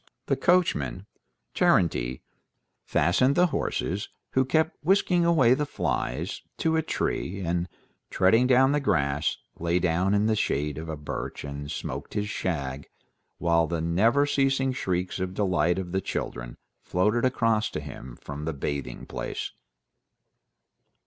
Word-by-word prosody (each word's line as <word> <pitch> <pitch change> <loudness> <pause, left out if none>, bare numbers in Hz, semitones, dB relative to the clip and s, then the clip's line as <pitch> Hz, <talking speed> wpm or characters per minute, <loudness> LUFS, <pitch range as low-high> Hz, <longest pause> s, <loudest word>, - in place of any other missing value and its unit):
The 135 - +1
coachman, 135 - +1 0.5
Terenty, 65 -8 +2 0.6
fastened 130 +11 +2
the 180 - +5
horses, 100 +5 -2 0.2
who 130 0 +2
kept 160 +4 0
whisking 180 0 +3
away 150 -8 +5
the 150 +2 -1
flies, 75 - -2 0.2
to 160 0 +1
a 160 - +3
tree, 100 - -2
and, 85 0 -1 0.4
treading 115 +7 +4
down 130 +1 +5
the 145 - +2
grass, 70 - +1 0.2
lay 85 +1 +1
down 90 +3 +2
in 105 +1 +2
the 110 0 +2
shade 75 -7 -1
of 80 +1 -7
a 80 - -4
birch 75 - -5
and 70 0 -6
smoked - - -5
his 105 0 -1
shag, 70 -6 -3 0.5
while 85 -1 +2
the 85 -1 -2
never 110 - +3
ceasing 135 -2 +1
shrieks 90 -5 -2
of 95 0 -3
delight 90 -4 +2
of 90 -2 -4
the 95 +1 0
children - - -4 0.2
floated 105 +6 +1
across 115 -4 +2
to - - -4
him 65 -4 -9
from 75 +1 -6
the 80 - -2
bathing 70 -3 -4
place. - - -4
95 Hz, 140 wpm, -27 LUFS, -, 0.6 s, the